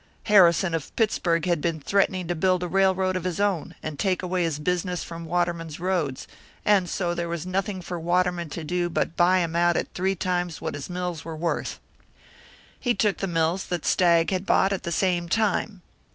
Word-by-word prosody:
Harrison 185 -4 +5
of 160 -4 -4
Pittsburg 170 -7 +1
had 175 -4 +1
been 165 -1 -1
threatening 185 +2 +1
to 175 - 0
build 185 +2 +1
a - - -1
railroad 190 0 +2
of 185 - -2
his 180 -1 -3
own, 200 -6 0
and 155 -2 -5
take 185 -2 0
away 180 0 -1
his 165 -3 -1
business 180 +3 -1
from 165 0 -8
Waterman's 170 -2 -2
roads, 170 -7 -1 0.4
and 195 -4 +3
so 175 -1 -1
there 170 0 -3
was 170 0 -4
nothing 185 0 -2
for 175 0 -5
Waterman 175 0 0
to 165 +2 -6
do 175 +2 -1
but 165 - -1
buy 180 +1 +4
him 165 -1 -2
out 175 0 +3
at - - -3
three 190 +2 0
times 180 -2 -2
what 160 - -4
his 145 +2 -6
mills 180 -3 -4
were 165 -1 -6
worth. 165 +2 -2 1.0
He 245 -2 +1
took 210 -3 +1
the 195 - -2
mills 170 +2 0
that 175 -3 -3
Stagg 170 -1 +3
had 185 -1 -1
bought 195 +1 +3
at 195 - -3
the 170 - -4
same 175 -1 0
time. 210 -2 0
175 Hz, 200 wpm, -25 LUFS, 170-185 Hz, 1.0 s, Harrison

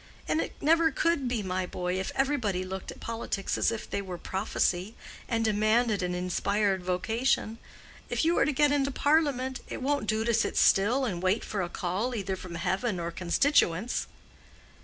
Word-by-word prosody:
And 320 - +1
it - - -6
never 325 +2 +4
could 315 -2 0
be, 240 -4 -1
my 185 -1 -2
boy, 180 +1 -2
if 190 - -3
everybody 250 -9 0
looked 190 +1 -6
at - - -8
politics 225 -4 -3
as - - +2
if 230 - -5
they 200 - -2
were 185 -3 -6
prophecy, 190 +1 -1 0.3
and 225 -2 +1
demanded 215 0 +2
an 180 0 -1
inspired 190 +2 0
vocation. 220 +5 0 0.5
If - - 0
you 335 +1 +3
are - - +4
to 300 - +1
get 295 +1 +3
into 280 -1 +2
Parliament, 280 -3 +1
it - - -5
won't 285 -5 0
do 215 +1 +1
to 235 - +2
sit 225 - +1
still 235 +8 +4
and 180 -7 -3
wait 185 +4 +1
for 205 - -2
a 175 - -2
call 195 +9 -2
either 195 -3 -2
from 180 -2 -8
heaven 185 +4 -1
or 170 0 -3
constituents." 185 - +1
215 Hz, 180 wpm, -28 LUFS, 185-260 Hz, 0.5 s, never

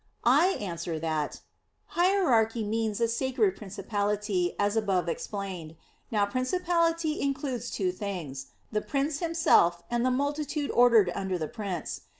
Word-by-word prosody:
I 300 +10 +5
answer 170 -4 -4
that, 155 -2 -2 0.5
Hierarchy 260 - +2
means 220 0 -1
a 230 - +3
"sacred" 260 - +1
principality, 200 -2 -2
as 205 +1 +1
above 195 -6 +1
explained. 180 -3 -5 0.3
Now 210 -3 +2
principality 330 - 0
includes 270 -4 -2
two 185 -3 -1
things: 175 -9 -5 0.2
the 210 -1 0
prince 285 +1 -1
himself 320 - +3
and 240 0 +1
the 255 - +3
multitude 285 +2 -1
ordered 230 -6 +5
under 190 -1 -2
the 155 -2 -3
prince. 195 -6 -5
220 Hz, 130 wpm, -28 LUFS, 190-280 Hz, 0.5 s, I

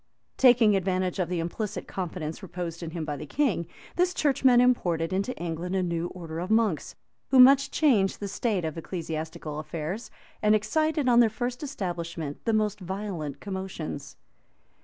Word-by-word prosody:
Taking 240 -5 +6
advantage 185 -1 0
of 175 -2 0
the 180 -2 -1
implicit 210 +5 -4
confidence 170 -3 -4
reposed 175 -3 -5
in 165 - -4
him 165 -1 -4
by 150 -1 -3
the 145 - -7
king, 215 - 0 0.3
this 360 +1 +2
churchman 265 -4 +4
imported 180 -9 +2
into 200 +7 -1
England 175 +2 -3
a 190 - +1
new 170 -1 -1
order 165 -3 -7
of 180 +3 -4
monks, 220 -7 +1 0.3
who 265 - +5
much 275 +2 +8
changed 215 - +2
the 205 - -4
state 200 -3 -1
of 160 - -3
ecclesiastical 160 -3 -5
affairs, 160 +8 -5 0.3
and 210 0 +5
excited, 300 +7 +1
on 240 -1 +6
their 235 -2 +6
first 245 +3 -4
establishment, 170 - -4
the 230 - +2
most 210 -1 +1
violent 180 -7 -5
commotions. 185 -9 -6
190 Hz, 160 wpm, -27 LUFS, 165-230 Hz, 0.3 s, much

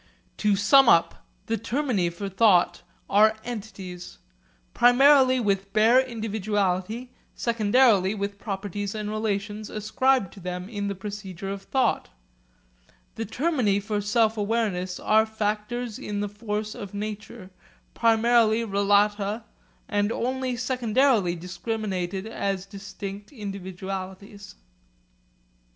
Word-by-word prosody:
To 210 -1 +2
sum 235 +6 +6
up: 170 -6 +3 0.2
the 225 - -1
termini 225 -5 0
for 170 +4 -6
thought 190 -4 +3 0.3
are 215 +2 +4
entities, 195 -6 -7 0.6
primarily 260 +1 +5
with 195 -3 -1
bare 225 +4 +5
individuality, 215 -1 -2 0.2
secondarily 220 -3 +3
with 200 0 -4
properties 205 -1 -4
and 210 -1 -4
relations 210 -1 -3
ascribed 220 0 +1
to 200 - -12
them 180 0 -5
in 205 -2 -4
the 200 - -3
procedure 195 -1 -6
of 200 0 -5
thought; 260 +6 0 1.0
the 225 - -4
termini 245 -5 +1
for 205 0 -2
sense 220 +2 +2
awareness 205 -4 -1
are 220 +1 +3
factors 220 +2 -3
in 205 -1 -4
the 205 - -2
fact 210 0 -4
of 205 -4 -8
nature, 210 -1 -6 0.4
primarily 230 0 +3
relata 205 +1 +1 0.4
and 205 0 0
only 255 +1 -2
secondarily 240 -5 +2
discriminated 190 +1 -4
as 195 -4 -3
distinct 200 0 -8
individualities. 195 -2 -7
210 Hz, 110 wpm, -25 LUFS, 195-230 Hz, 1.0 s, sum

